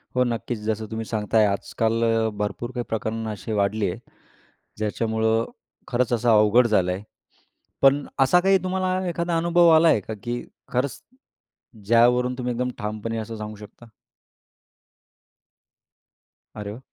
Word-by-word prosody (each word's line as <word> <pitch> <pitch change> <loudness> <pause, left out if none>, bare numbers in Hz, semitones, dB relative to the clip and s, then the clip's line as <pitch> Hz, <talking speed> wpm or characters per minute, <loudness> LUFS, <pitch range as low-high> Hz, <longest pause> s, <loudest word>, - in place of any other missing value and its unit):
हो 125 - +4
नक्कीच 120 -1 -3
जसं 110 +1 -2
तुम्ही 110 0 -4
सांगताय, 110 0 +1
आजकाल 110 +3 -1
अ, 115 -1 +2
भरपूर 110 +4 -4
काही 120 - -2
प्रकरणं 110 0 -3
अशी 105 +1 -7
वाढली 100 0 +1
आहे; - - -8 0.8
ज्याच्यामुळं 110 +1 0 0.4
खरंच 125 0 0
असं 120 0 +1
अवघड 110 +2 +5
झालं 95 -5 +2
आहे. 95 +3 -4 0.8
पण 140 +1 +4
असा 135 +7 +5
काही 195 +2 +4
तुम्हाला 185 0 -1
एखादा 170 0 -1
अनुभव 170 +1 +4
आलाय 160 0 +6
आहे 105 - +2
का 110 - -6
की 120 0 -3 0.3
खरंच 130 +2 -1 0.9
ज्यावरून 120 +3 +4
तुम्ही 125 -1 -2
एकदम 125 +1 -1
ठामपणे 110 +2 -4
असं 110 0 -5
सांगू 105 0 -6
शकता? 105 +3 -14 2.7
अरे! 105 +2 -6
115 Hz, 135 wpm, -24 LUFS, 110-125 Hz, 2.7 s, आलाय